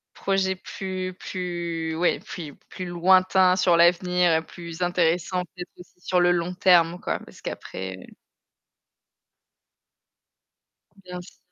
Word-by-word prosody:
Projet 195 -1 0
plus 185 0 -5
plus 170 -3 -4
ouais, 175 +1 +1
puis 155 -5 -8
plus - - -26
plus 185 - -7
lointain 185 +1 +4
sur 180 -2 +4
l'avenir 180 0 +4
et 160 0 +2
plus 170 +1 -10
intéressant 180 +1 +1
peut-être 180 +1 -10
aussi 180 0 -16
sur 180 0 +1
le 175 0 +4
long 175 +1 0
terme 175 -1 +4
quoi, - - -2
parce - - -15
qu'après 95 0 -6 3.0
Bien 180 0 -7
sûr. 180 - -15
180 Hz, 125 wpm, -25 LUFS, 170-185 Hz, 3.0 s, lointain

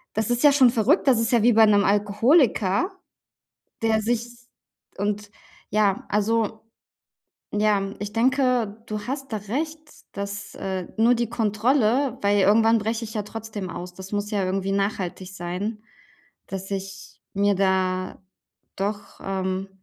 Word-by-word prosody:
das 220 +1 0
ist 240 +3 0
ja 290 - +8
schon 270 -3 +6
verrückt, 240 - +2
das 250 -4 +5
ist 230 +1 0
ja 235 - +4
wie 240 - +5
bei 220 0 +7
'nem 205 -1 +4
Alkoholiker, 210 - +3 0.9
der 220 -1 +2
sich 235 +1 0 0.7
und, 205 0 -2 0.4
ja 205 -2 +1
also, 220 +1 0 0.9
ja, 205 -1 +1
ich 205 0 -5
denke, 250 -3 +1
du 215 -1 -4
hast 270 -1 -4
da 215 - 0
recht, 300 +10 -3 0.3
dass, 200 0 -6
äh, 190 -2 -4
nur 230 +2 +5
die 235 -1 -1
Kontrolle 240 +3 +1
weil 205 0 +3
irgendwann 225 +3 +5
breche 225 +2 -2
ich 220 - -9
ja 210 - -1
trotzdem 210 -3 -6
aus. 175 +1 -7
Das 190 +2 -10
muss 205 +1 -2
ja 200 -2 0
irgendwie 195 +1 -1
nachhaltig 195 -2 -2
sein, 190 +5 -4 0.7
dass 195 0 -6
ich 195 0 -7
mir 200 0 +2
da 185 -1 0 0.6
doch, 200 +1 -4
ähm 190 0 -2
210 Hz, 145 wpm, -24 LUFS, 195-230 Hz, 0.9 s, ja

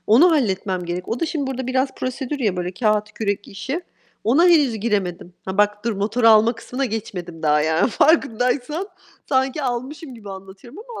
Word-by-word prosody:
Onu 280 +12 +6
halletmem 195 - 0
gerek. 175 +1 -4
O 230 - -2
da 330 - +1
şimdi 300 -4 -2
burada 260 -1 -4
biraz 260 +1 0
prosedür 265 +2 -4
ya, 210 -8 0
böyle 180 0 -3
kağıt, 215 +1 0
kürek 205 -2 -3
işi. 265 - -4 0.4
Ona 270 +11 +4
henüz 295 -9 +4
giremedim. 190 -5 -2
Ha, 190 +1 -5
bak 210 0 +2
dur, 235 - +1
motoru 220 +4 +2
alma 220 +1 +6
kısmına 255 +3 -4
geçmedim 185 -8 -5
daha 150 -1 +3
yani 160 +8 +2
farkındaysan. 285 - +1 0.4
Sanki 265 +2 +1
almışım 260 +3 -4
gibi 210 -4 -10
anlatıyorum 195 - -11
ama 450 - -7
230 Hz, 175 wpm, -21 LUFS, 195-265 Hz, 0.4 s, Onu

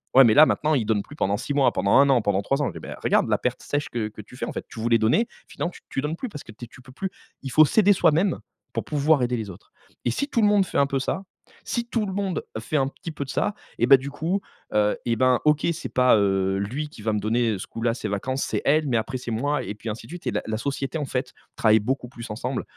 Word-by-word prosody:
ouais, 135 - +10
mais 110 - +5
là 150 +7 +9
maintenant, 155 0 +1
ils 120 -6 0
donnent 105 -2 +1
plus 145 - -13
pendant 100 -6 +1
6 145 - -4
mois, 140 -2 +4
pendant 100 +1 +1
1 140 0 +6
an, 130 -3 +4
pendant 100 -2 +1
3 135 +7 0
ans. 135 - -1
Eh - - -6
ben, - - -8
regarde - - +3
la - - +3
perte - - -2
sèche 145 0 -2
que 115 -3 -2
que 110 - -10
tu 125 - -15
fais - - -3
en - - -6
fait, - - -5
tu 115 - -9
voulais 115 +1 +3
donner 110 - +3
et 235 - -2 0.2
finalement 175 - -4 0.2
tu - - -3
donnes 150 +3 -2
plus 255 - -5
parce 150 -8 -9
que - - -12
tu 115 +3 -10
es - - -16
tu 125 - -15
peux 130 - -15
plus. 190 +8 -3 0.3
Il 135 - -5
faut 155 +4 +7
s'aider 205 +6 +4
soi-même, 175 +1 +2 0.3
pour - - -2
pouvoir 150 -2 +2
aider 125 0 0
les 105 -3 -5
autres. 85 - -16 0.3
Et 120 - +2
si 280 - -1
tout 235 - +1
le 210 - +5
monde 205 -2 +4
fait - - -4
un 140 - +4
peu 135 -1 -1
ça, 190 +8 -2 0.4
si 235 -1 -2
tout 230 -3 -1
le 190 - -4
monde 195 -2 -2 0.2
fait 130 +7 -2
un 135 -1 +2
petit 165 +4 -8
peu 145 -2 -5
de - - -14
ça 205 +8 -1 0.2
et 120 - +3
ben 135 0 +9
du 135 +2 -6
coup, 170 +7 -1 0.3
heu, 105 0 +3
et 115 - +1
ben, 130 0 +4
OK, 150 +1 +3
c'est 170 - -6
pas, 125 -1 +5
heu, 95 -1 +1
lui 130 +10 -3
qui 120 - -13
va 110 - +1
me 105 - 0
donner 110 +1 +1
ce - - -7
coup-là 115 0 -1
ses 115 - -4
vacances, 130 +7 -2
c'est - - -2
elle, 150 +1 +3
mais 125 - 0
après 130 +4 -2
c'est 125 -1 -6
moi 145 +6 0
et 105 - -5
puis 110 +2 -7
ainsi 110 +2 -6
de - - -13
suite 175 - -7
et - - +1
la - - -1
la 110 0 -2
société 140 +4 -3
en 150 - -2
fait 130 -1 -3 0.2
travaille 110 -1 +5
beaucoup 125 +4 -2
plus 120 -2 -9
ensemble 125 +4 -3
130 Hz, 295 wpm, -24 LUFS, 110-150 Hz, 0.4 s, ouais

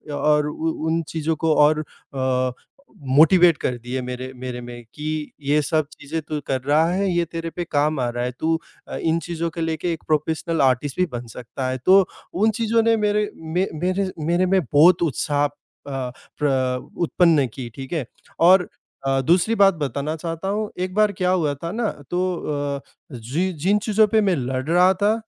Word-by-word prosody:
और 150 0 +2
उ 160 +2 -2 0.2
उन 165 +1 +1
चीज़ों 160 0 -1
को 160 -1 +3
और 150 +1 +4 0.3
अ, 130 -1 0 0.6
मोटिवेट 165 +4 +6
कर 125 -1 -2
दिए 125 +2 -3
मेरे 125 +1 -5
मेरे 125 -1 -6
में 120 0 -9
कि, 155 0 -4
"ये 145 +2 +2
सब 155 +1 0
चीज़ें 155 +2 -5
तू 150 0 -4
कर 130 - 0
रहा 145 +4 +3
है 195 +2 0
ये 175 0 +2
तेरे 165 0 -5
पे 175 +1 -4
काम 150 0 +1
आ 125 - 0
रहा 120 0 -3
है। 125 - -2
तू 160 0 +1 0.3
अ, - - -6
इन 165 0 +1
चीज़ों 170 -1 -3
को 165 +1 -6
लेके 160 +1 -1
एक 160 - -8
प्रोफ़ेशनल 160 +2 0
आर्टिस्ट 135 +1 +1
भी 180 - +4
बन 120 0 -4
सकता 125 +3 -6
है।" 130 - -2
तो 190 - +7 0.4
उन 210 +5 +3
चीज़ों 230 0 +2
ने 230 0 +4
मेरे 210 0 +1 0.3
मे 185 +2 +2
मेरे 185 +4 -1 0.2
मेरे 175 +3 +2
में 190 +1 +3
बहुत 165 +5 +6
उत्साह। 145 -1 0
अ, - - -1 0.4
प्र 130 0 -2
उत्पन्न 165 -5 +3
की 125 -3 -6
ठीक 135 +3 -7
है 155 -6 -1 0.4
और 185 -1 +5 0.4
अ, 135 0 +2
दूसरी 175 - +2
बात 195 -1 +6
बताना 140 +3 -2
चाहता 165 +2 -5
हूँ 210 +2 -2
एक 185 0 -2
बार 210 -1 +4
क्या 185 -2 -1
हुआ 160 -6 +1
था 165 - -3
ना 220 +1 -1 0.2
तो 175 +1 0 0.6
अ, - - -10 0.3
जी, 135 +11 -2
जिन 180 +7 +1
चीज़ों 215 0 +4
पे 220 +1 +3
मैं 195 -3 +2
लड़ 130 -2 -2
रहा 180 +2 +5
था। 205 +3 +2
160 Hz, 190 wpm, -22 LUFS, 135-180 Hz, 0.6 s, तो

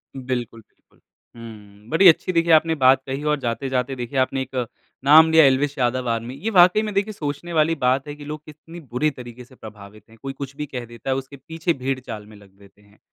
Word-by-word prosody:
बिल्कुल, 125 -3 -5
बिल्कुल। - - -34 0.4
हुँ, 105 -3 -13
बड़ी 185 +4 +5
अच्छी 175 +2 +4
देखिए 165 0 +2
आपने 160 +1 +4
बात 130 -2 +4
कही 135 +2 -5
और 150 -1 0
जाते-जाते 130 +1 -2
देखिए 125 +1 -3
आपने 130 +1 0
एक 130 0 -8 0.5
नाम 160 +3 +7
लिया 160 0 +7
एल्विश 140 +2 +1
यादव 125 0 -1
आर्मी। 115 +2 -3
ये 225 - 0
वाक़ई 180 0 +5
में 215 -1 -4
देखिए 200 +2 -1
सोचने 160 0 -5
वाली 160 +1 +2
बात 130 +3 +1
है 145 - -7
कि 145 0 -12
लोग 150 +1 -7
कितनी 160 +3 -13
बुरी 140 0 -1
तरीके 125 -2 -11
से 130 - -20
प्रभावित 105 -2 -13
हैं। 115 - -18
कोई 135 0 -6
कुछ 135 0 -8
भी 150 - -5
कह 125 -4 -7
देता 120 +3 -9
है, 130 - +1
उसके 135 +1 -7
पीछे 160 +5 -3
भेड़चाल 130 -6 -5
में 105 - -15
लग 100 -1 -18
देते 100 0 -21
हैं, 100 0 -25
135 Hz, 220 wpm, -22 LUFS, 120-155 Hz, 0.5 s, नाम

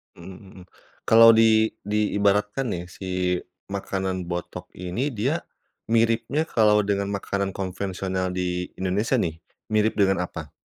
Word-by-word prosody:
Mhm 90 +2 -11 0.2
mhm. - - -12 0.4
Kalau 115 0 +8
di 110 0 +4
diibaratkan 105 +3 +1
nih, 85 0 -3
si 95 - -9 0.6
makanan 95 -2 -3
botok 90 +1 -5
ini, 90 +9 -3
dia 135 +8 -1 0.5
miripnya 115 +6 +2
kalau 105 -6 +3
dengan 100 -1 0
makanan 100 0 -2
konvensional 95 0 -3
di 90 -1 -2
Indonesia, 100 +7 0
nih, 80 -6 -2 0.3
mirip 110 +1 +2
dengan 95 -2 +3
apa? 80 -3 -9
100 Hz, 125 wpm, -24 LUFS, 95-110 Hz, 0.6 s, Kalau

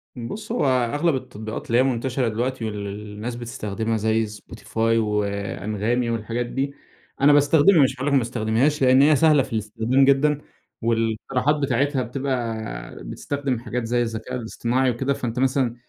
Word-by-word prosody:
بُص، 170 - -6
هو 240 - +1
أغلب 135 +5 +2
التطبيقات 110 -4 -6
اللي 120 - +2
هي 125 - +5
منتشرة 130 0 0
دلوقتي 120 +2 -2
واللي 105 -2 -4
الناس 105 +3 -6
بتستخدمها، 115 -1 -3
زي 110 +1 +1
Spotify 105 +1 -13 0.2
وAnghami 105 +2 -1
والحاجات 115 +2 -2
دي، 135 +3 -3 0.5
أنا 145 +1 +6
باستخدمها، 145 +3 +5
مش 130 - +2
هاقول 135 +2 -4
لك 145 - +1
ما - - +6
باستخدمهاش، 120 +5 0
لأن 130 0 +6
هي 150 +2 +6
سهلة 150 -1 +4
في 125 - -9
الاستخدام 110 +5 +1
جدًا، 145 +2 +3 0.4
والاقتراحات 115 +5 0
بتاعتها 140 -1 0
بتبقى 120 -3 -4
بتستخدم 140 -4 -3
حاجات 120 +1 -4
زي 120 +1 +1
الذكاء 115 +2 -4
الاصطناعي 120 +2 0
وكده. 130 +4 -1
فأنت 125 -2 -4
مثلًا 130 -2 +1
120 Hz, 150 wpm, -23 LUFS, 110-135 Hz, 0.5 s, أنا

